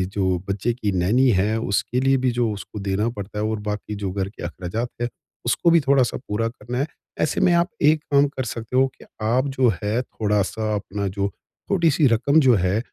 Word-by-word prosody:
जो 95 Hz, -3 st, +1 dB
बच्चे 105 Hz, +5 st, 0 dB
की 110 Hz, -4 st, -2 dB
नैनी 105 Hz, +9 st, +3 dB
है 110 Hz, +3 st, 0 dB
उसके 115 Hz, +4 st, 0 dB
लिए 135 Hz, 0 st, +3 dB
भी 125 Hz, -, +3 dB
जो 115 Hz, -2 st, +2 dB
उसको 105 Hz, +1 st, -8 dB
देना 105 Hz, +4 st, +1 dB
पड़ता 100 Hz, +1 st, -5 dB
है 105 Hz, -, 0 dB
और 110 Hz, 0 st, -1 dB
बाकी 105 Hz, 0 st, -3 dB
जो 100 Hz, -2 st, -3 dB
घर 95 Hz, 0 st, -2 dB
के 100 Hz, -, -11 dB
अख़राजात 90 Hz, +7 st, -4 dB
है, 120 Hz, -, 0 dB, 0.4 s
उसको 145 Hz, +8 st, +2 dB
भी 170 Hz, -, +6 dB
थोड़ा-सा 135 Hz, -3 st, +3 dB
पूरा 110 Hz, +2 st, 0 dB
करना 120 Hz, +1 st, -7 dB
है। 140 Hz, -, 0 dB, 0.3 s
ऐसे 155 Hz, -, +1 dB
में 175 Hz, -, +4 dB
आप 170 Hz, +1 st, +3 dB, 0.2 s
एक 155 Hz, -1 st, -1 dB
काम 140 Hz, 0 st, +5 dB
कर 130 Hz, -2 st, -4 dB
सकते 115 Hz, +2 st, -6 dB
हो 135 Hz, +1 st, +5 dB
कि -, -, -15 dB, 0.2 s
आप 120 Hz, +5 st, +1 dB
जो 130 Hz, -2 st, +5 dB
है 105 Hz, +4 st, +1 dB
थोड़ा-सा 105 Hz, -1 st, -1 dB
अपना 100 Hz, 0 st, -3 dB
जो 100 Hz, -, +2 dB
छोटी-सी 165 Hz, -, 0 dB
रक़म 140 Hz, +7 st, +3 dB
जो 125 Hz, -, +7 dB
है, 95 Hz, +2 st, +1 dB
110 Hz, 210 wpm, -23 LUFS, 100-130 Hz, 0.4 s, जो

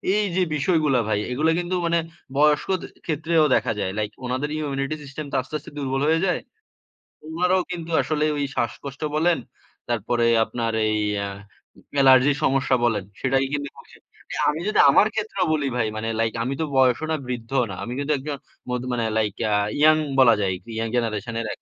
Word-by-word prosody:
এই 210 Hz, 0 st, +2 dB
যে 185 Hz, -, +3 dB
বিষয়গুলা 150 Hz, -4 st, +2 dB
ভাই, 105 Hz, -, +1 dB
এগুলা 155 Hz, +6 st, +2 dB
কিন্তু 175 Hz, +1 st, -2 dB
মানে 170 Hz, 0 st, +2 dB, 0.4 s
বয়স্ক 150 Hz, +3 st, +3 dB, 0.4 s
ক্ষেত্রেও 160 Hz, 0 st, +2 dB
দেখা -, -, +1 dB
যায়। 95 Hz, -2 st, -1 dB
লাইক 105 Hz, 0 st, -2 dB
ওনাদের 130 Hz, +4 st, -2 dB
ইমিউনিটি 140 Hz, -1 st, -2 dB
সিস্টেম 140 Hz, +2 st, -7 dB
তো -, -, -3 dB
আস্তে, 135 Hz, -, -8 dB
আস্তে 150 Hz, -, -13 dB
দুর্বল 135 Hz, -1 st, -1 dB
হয়ে 160 Hz, +1 st, +3 dB
যায়। 180 Hz, -, 0 dB, 0.9 s
উনারাও 180 Hz, +1 st, +2 dB
কিন্তু 170 Hz, -1 st, -5 dB
আসলে 155 Hz, -1 st, 0 dB
ওই 145 Hz, -, 0 dB
শ্বাসকষ্ট 135 Hz, +4 st, -4 dB
বলেন। 165 Hz, +2 st, +3 dB, 0.5 s
তারপরে 120 Hz, +1 st, 0 dB, 0.2 s
আপনার 115 Hz, -2 st, -3 dB, 0.2 s
এই 110 Hz, 0 st, +1 dB, 0.3 s
আ -, -, -3 dB, 0.7 s
এলার্জির 135 Hz, +2 st, +6 dB
সমস্যা 135 Hz, -1 st, +2 dB
বলেন। 110 Hz, -5 st, +1 dB, 0.2 s
সেটাই 135 Hz, +1 st, +2 dB
কিন্তু 145 Hz, -1 st, -2 dB, 0.8 s
আমি 150 Hz, +2 st, -2 dB
যদি, 215 Hz, -, +1 dB
আমার 200 Hz, +9 st, +6 dB
ক্ষেত্রেও 210 Hz, -4 st, -1 dB
বলি 145 Hz, -3 st, 0 dB
ভাই, 115 Hz, -3 st, +1 dB
মানে 110 Hz, +1 st, -3 dB
লাইক 115 Hz, -1 st, +1 dB
আমি 130 Hz, -, -2 dB
তো 160 Hz, -, +1 dB
বয়সও 130 Hz, +3 st, +3 dB
না, 160 Hz, -, +2 dB
বৃদ্ধও 125 Hz, +1 st, -1 dB
না। -, -, -5 dB
আমি 120 Hz, -, -5 dB
কিন্তু 145 Hz, +1 st, -1 dB
একজন 140 Hz, +1 st, -5 dB, 0.3 s
মধ 125 Hz, 0 st, -1 dB
মানে 115 Hz, -2 st, 0 dB
লাইক, 105 Hz, -3 st, +1 dB, 0.2 s
আ -, -, +2 dB, 0.3 s
ইয়ং 155 Hz, +1 st, +6 dB, 0.2 s
বলা 120 Hz, -3 st, +7 dB
যায়। 95 Hz, -2 st, +1 dB, 0.2 s
ইয়ং 115 Hz, 0 st, -1 dB
জেনারেশন 115 Hz, 0 st, -2 dB
এর 115 Hz, -, -4 dB
135 Hz, 175 wpm, -23 LUFS, 120-155 Hz, 0.9 s, বলা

